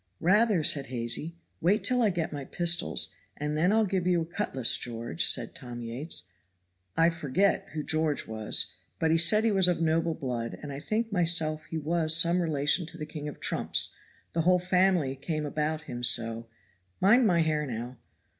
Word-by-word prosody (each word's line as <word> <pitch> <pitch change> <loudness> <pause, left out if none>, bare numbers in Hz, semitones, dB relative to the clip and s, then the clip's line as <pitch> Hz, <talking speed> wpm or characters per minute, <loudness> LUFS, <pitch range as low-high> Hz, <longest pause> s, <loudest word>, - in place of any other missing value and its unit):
'Rather,' 205 -1 +3
said 140 -2 +2
Hazy. 125 +7 -3 0.3
'Wait 195 +6 +2
till 250 -1 +1
I 220 - +4
get 170 -4 -3
my 145 -1 -5
pistols, 170 +4 0 0.2
and 150 +1 -2
I'll 220 0 +3
give 185 -2 -1
you 180 -1 +3
a - - -3
cutlass, 160 - +1
George,' 115 -7 -3
says - - +3
Tom 120 -1 -9
Yates. 125 +8 -5 0.7
I 165 +1 +4
forget 165 +5 0
who 155 -1 -3
George 155 -1 0
was; 110 -1 +2 0.2
but 160 - +1
he 165 - +4
said 210 +6 +4
he 225 - +2
was 190 -3 +4
of 175 -2 +1
noble 165 0 +1
blood, 120 -3 -4
and 145 -1 -6
I 135 - -6
think 220 +8 -2
myself 165 -4 0
he 160 - -5
was 160 +1 +1
some 170 +2 +3
relation 155 +1 +1
to 170 - -11
the 155 - -5
King 150 -1 -7
of 150 - -8
trumps, - - 0 0.4
the 165 - +1
whole 180 +2 +4
family 180 -6 +1
came 155 +2 -4
about 155 +1 -2
him 120 -5 -7
so 115 -1 0 0.5
mind 225 +6 +5
my 170 -4 +3
hair 155 -2 0
now. 120 +1 -6
160 Hz, 185 wpm, -28 LUFS, 140-180 Hz, 0.7 s, mind